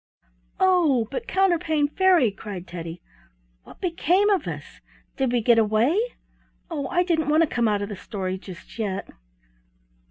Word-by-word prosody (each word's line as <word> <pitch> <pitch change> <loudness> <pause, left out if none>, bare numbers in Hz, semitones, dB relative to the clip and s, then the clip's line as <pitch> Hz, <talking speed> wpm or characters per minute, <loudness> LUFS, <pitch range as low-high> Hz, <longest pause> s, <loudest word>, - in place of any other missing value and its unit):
"Oh! 330 -11 +3
but, 485 -1 -4
Counterpane 330 -6 +2
Fairy," 350 - +3
cried 200 -3 -8
Teddy, 170 -1 -8 0.6
"what - - -15
became 365 +3 +2
of 390 - +1
us? - - -8 0.3
Did 265 -3 0
we 245 -1 +1
get 235 0 +5
away? 220 - +2 0.8
Oh, 285 -4 -3
I 355 +6 +2
didn't 320 -4 0
want 310 +2 +5
to 315 - -3
come 240 -2 +2
out 205 -1 +1
of 200 - -5
the 205 - -5
story 190 -1 -4
just 185 +3 -12
yet!" 200 -3 -2
260 Hz, 155 wpm, -24 LUFS, 205-345 Hz, 0.8 s, get